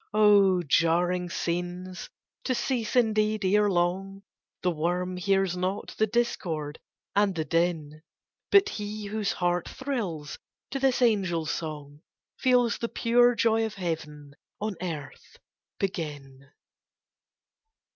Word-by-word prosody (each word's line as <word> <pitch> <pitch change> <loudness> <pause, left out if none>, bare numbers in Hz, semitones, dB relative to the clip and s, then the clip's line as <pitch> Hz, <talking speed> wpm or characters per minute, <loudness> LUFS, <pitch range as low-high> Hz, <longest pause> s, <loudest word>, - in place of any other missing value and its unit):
Oh, 200 -4 +5
jarring 175 +4 +2
scenes! 175 +2 -4 0.4
to 255 - +1
cease, 235 -3 -1
indeed, 215 -3 +2
ere 205 +2 +4
long; 190 +2 -1 0.4
The 180 - +2
worm 175 +3 -1
hears 195 0 +1
not 185 +2 -3
the 220 - +2
discord 165 -10 -2 0.4
and 200 -2 +3
the 160 -1 -2
din; 165 -3 -1 0.5
But 400 0 +6
he 210 - -5
whose 210 0 -1
heart 175 -1 0
thrills 200 - -4 0.3
to 275 - -2
this 265 -1 +2
angel 190 -8 +2
song, 150 -2 -5 0.4
Feels 250 -2 +3
the 235 - -2
pure 240 +1 +3
joy 225 0 +2
of 220 -1 -3
heaven 150 -6 -5 0.3
on 210 -1 -3
earth 155 -6 -7 0.4
begin! 145 -7 -5
185 Hz, 115 wpm, -27 LUFS, 165-215 Hz, 0.5 s, But